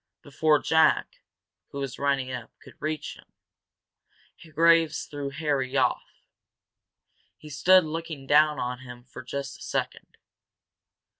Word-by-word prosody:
Before 150 +2 +2
Jack, 160 +1 +2 0.5
who - - -9
was 135 -3 -5
running 140 -2 0
up, 125 -2 -6
could - - -15
reach 155 0 -4
them, - - -20 1.2
Graves 165 +1 +3
threw 145 -1 -5
Harry 140 -3 -2
off. 125 -2 -1 1.1
He 150 - -13
stood 185 +6 +5
looking 160 -3 -6
down 150 +2 +4
on 125 0 -3
him 120 -2 -11
for 130 +1 -11
just 140 +2 -6
a - - -18
second. - - -4
140 Hz, 125 wpm, -26 LUFS, 135-155 Hz, 1.2 s, stood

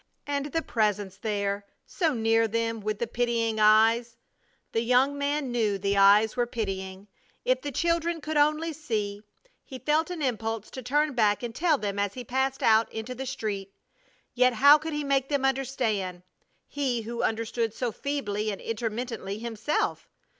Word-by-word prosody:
And 285 -1 -2
the 325 +3 -2
Presence 205 -4 -1
there! 200 -2 -2 0.2
So 320 -6 0
near 225 0 +3
them, 230 +1 -1
with 215 0 -3
the 235 - -1
pitying 230 -1 0
eyes! 225 +2 +4 0.5
The 225 - 0
young 250 +4 +3
man 285 -1 -1
knew 220 -4 +1
the 200 +1 0
eyes 200 +2 +5
were 245 -1 +1
pitying! 195 -4 -4 0.4
If - - +2
the 290 - -4
children 335 +3 0
could 310 0 -4
only 305 +2 +2
see! 215 -9 -3 0.4
He 260 - -9
felt 305 +5 +1
an 345 -4 -4
impulse 225 -4 -2
to 260 - -7
turn 295 +4 +1
back 215 -2 +2
and 235 -1 -4
tell 320 +2 +2
them 200 -4 -3
as 200 -1 -1
he 250 - -6
passed 265 +2 -1
out 220 0 +4
into 220 +3 -5
the 265 +2 -6
street, 200 -5 -4 0.6
yet 250 0 +4
how 285 +6 +7
could 320 +1 -5
he 295 0 -2
make 275 -1 +1
them 280 -2 +1
understand 235 -9 -1 0.4
he 255 -5 -2
who 235 +2 -4
understood 225 0 -1
so 240 +2 -3
feebly 215 -7 -2
and 200 - -4
intermittently 225 -2 -4
himself? 230 +6 -2
235 Hz, 170 wpm, -27 LUFS, 215-275 Hz, 0.6 s, how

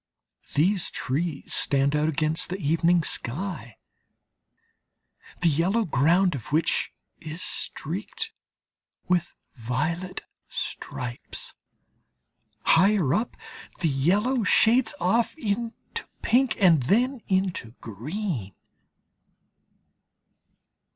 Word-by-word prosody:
These 180 +5 +2
trees 145 +2 -3
stand 140 +1 +2
out 150 +1 +2
against 155 +1 +1
the 185 - -3
evening 165 +1 +2
sky, 130 - -3 1.6
the 175 - +4
yellow 180 +9 +2
ground 170 +6 +3
of 135 -1 -7
which 155 +3 +1 0.3
is 165 +2 -5
streaked 180 +8 -3 0.8
with 180 -2 0 0.2
violet 155 +9 -3 0.2
stripes. 120 -1 -4 1.1
Higher 185 -5 +4
up 225 +3 -1 0.4
the 165 - +2
yellow 205 - +2
shades 225 +4 +4
off 230 - +1
into 230 -2 -4 0.2
pink 255 +2 +3
and 170 -7 +5
then 240 - +1
into 185 - -1
green. 120 - -4
170 Hz, 85 wpm, -26 LUFS, 140-200 Hz, 1.6 s, and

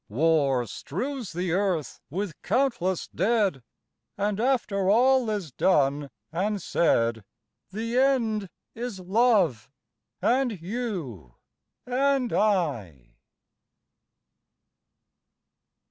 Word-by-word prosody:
War 140 0 +2
strews 230 - -5
the 175 +1 -2
earth 180 -6 -1
with 185 +2 -4
countless 205 -6 0
dead, 200 - +1 0.6
And 205 0 -1
after 215 -6 +1
all 250 +2 +4
is 200 -8 -3
done 145 -2 +2 0.2
and 200 +5 -1
said, 115 - +1 0.5
The 230 +5 -1
end 230 -7 +1 0.2
is 235 -4 -5
love, 185 - +2 0.5
and 245 -5 +1
you 170 - -5 0.5
and 260 0 +1
I! 115 - 0
195 Hz, 85 wpm, -26 LUFS, 150-235 Hz, 0.6 s, all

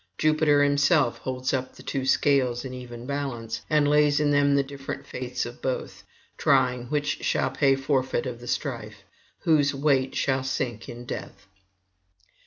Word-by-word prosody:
Jupiter 155 -2 +3
himself 145 -2 +3
holds 130 0 -3
up 130 -1 -2
the - - -13
two 135 -1 -3
scales 130 -3 +2
in 130 - -6
even 120 -1 -8
balance, 135 -5 -4
and 150 -1 +3
lays 150 0 +4
in 150 -1 +2
them 145 0 +4
the 140 - +3
different 135 0 -7
fates 125 0 -4
of 120 0 -9
both, 130 -1 -3 0.4
trying 125 -3 +2
which 145 +1 -1
shall - - +1
pay 135 -2 +3
forfeit 135 -2 0
of 125 -2 -5
the 120 - -11
strife, - - -4 0.4
whose 145 -3 +3
weight 135 -2 +1
shall 135 -1 +1
sink 120 -4 -3
in 120 +1 -8
death. 100 -3 -7
135 Hz, 160 wpm, -26 LUFS, 125-145 Hz, 0.4 s, lays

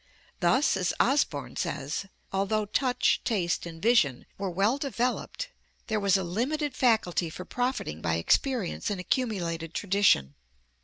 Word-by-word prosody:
Thus, 250 - +3
as 180 -3 0
Osborn 235 - +1
says, 145 +8 -3 0.3
although 200 +2 +1
touch, 250 +4 +1
taste 180 -8 0
and 165 -1 -9
vision 165 - +3
were 195 -1 -3
well 200 +9 +1
developed 275 - -2 0.4
there 220 -2 0
was 200 -1 +3
a 190 - -2
limited 260 - -1
faculty 220 -9 +2
for 180 +3 -8
profiting 245 - -2
by 85 - 0
experience 225 - +1
and 200 -3 -2
accumulated 175 - -2
tradition. 195 - +3
200 Hz, 135 wpm, -28 LUFS, 170-245 Hz, 0.4 s, Thus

